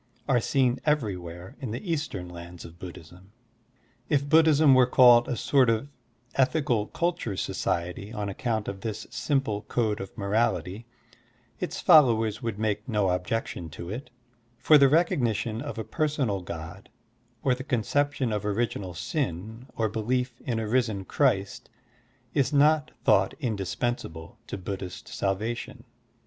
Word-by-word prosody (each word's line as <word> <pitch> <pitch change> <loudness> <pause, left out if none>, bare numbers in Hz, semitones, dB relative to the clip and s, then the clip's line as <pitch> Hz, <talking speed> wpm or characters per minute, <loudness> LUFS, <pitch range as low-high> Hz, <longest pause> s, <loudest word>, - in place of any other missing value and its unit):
are 135 -4 +3
seen 130 0 +1
every 145 -10 +1
where 90 +5 -9
in 130 -5 -5
the 170 - -4
Eastern 145 - -4
lands 85 0 -10
of 85 0 -13
Buddhism. 90 +2 -11 0.8
If 140 -1 +1
Buddhism 155 -2 +6
were 130 -1 +6
called 120 -2 +7
a 125 - -1
sort 130 -1 +3
of 115 +5 0 0.4
ethical 130 -5 +1
culture 170 - -2
society 90 +5 -2
on 105 -3 -3
accoimt 110 +2 -2
of 95 -1 -5
this 110 -1 -4
simple 120 -3 -1
code 110 -1 -1
of 95 - -9
morality, 105 0 -1 0.7
its - - -4
followers 115 -6 +5
would 115 -4 -3
make 105 +1 -2
no 105 -4 +2
objection 90 -2 -3
to 85 +2 -6
it, 125 +6 -6 0.5
for 150 +5 +6
the 140 -1 +6
recognition 120 - +1
of 145 -3 -6
a 110 - -3
personal 135 - -1
God, 85 +2 -8 0.5
or 130 - +3
the 130 +1 -5
concep 145 +2 0
tion 125 -4 -1
of 105 -1 -2
original 100 -4 -2
sin, 110 - -4
or 110 - +2
belief 125 +3 -2
in 120 -3 -2
a 110 -1 -2
risen 110 -5 0
Christ 100 -6 0 0.6
is 135 -2 +2
not 150 +1 +4
thought - - +3
indispensable 100 - -3
to - - -5
Buddhist 95 -1 -6
salvation. 105 +5 -3
115 Hz, 145 wpm, -27 LUFS, 100-130 Hz, 0.8 s, called